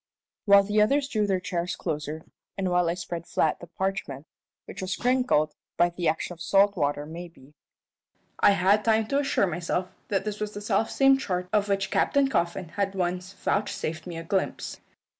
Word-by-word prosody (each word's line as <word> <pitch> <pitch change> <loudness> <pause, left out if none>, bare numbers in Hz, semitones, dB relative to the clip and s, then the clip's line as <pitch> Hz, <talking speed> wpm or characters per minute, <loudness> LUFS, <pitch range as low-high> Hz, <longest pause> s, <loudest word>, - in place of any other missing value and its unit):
While 200 -1 +7
the 210 +1 +2
others 275 +6 +3
drew 215 -6 0
their 190 -2 +1
chairs 180 -1 -3
closer, 155 -1 -4 0.3
and 190 -2 -1
while 180 -1 +2
I 170 - 0
spread 170 -1 -6
flat 155 - +1
the 175 - -10
parchment 170 -6 -3 0.4
which - - -8
was 185 +1 -2
crinkled 245 -12 +2 0.2
(by 175 0 +4
the 175 -1 -2
action 160 +3 -1
of 170 - -15
salt 200 +3 +4
water, 145 -3 -1
maybe) 160 -3 -10 0.9
I 205 - +6
had 200 +3 +3
time 220 -1 +3
to 280 - +2
assure 275 -7 +2
myself 180 +1 -2 0.2
that 195 0 -1
this 210 -1 -4
was 210 0 -3
the - - -4
selfsame 270 +6 +3
chart 180 -8 -3
of 205 -1 +2
which 195 -1 0
Captain 280 -1 +3
Coffin 170 -5 -1
had 195 +2 -2
once 180 0 -2
vouchsafed 185 -5 -2
me 170 -2 -6
a 165 - -5
glimpse. 190 +3 -2
185 Hz, 180 wpm, -26 LUFS, 170-205 Hz, 0.9 s, While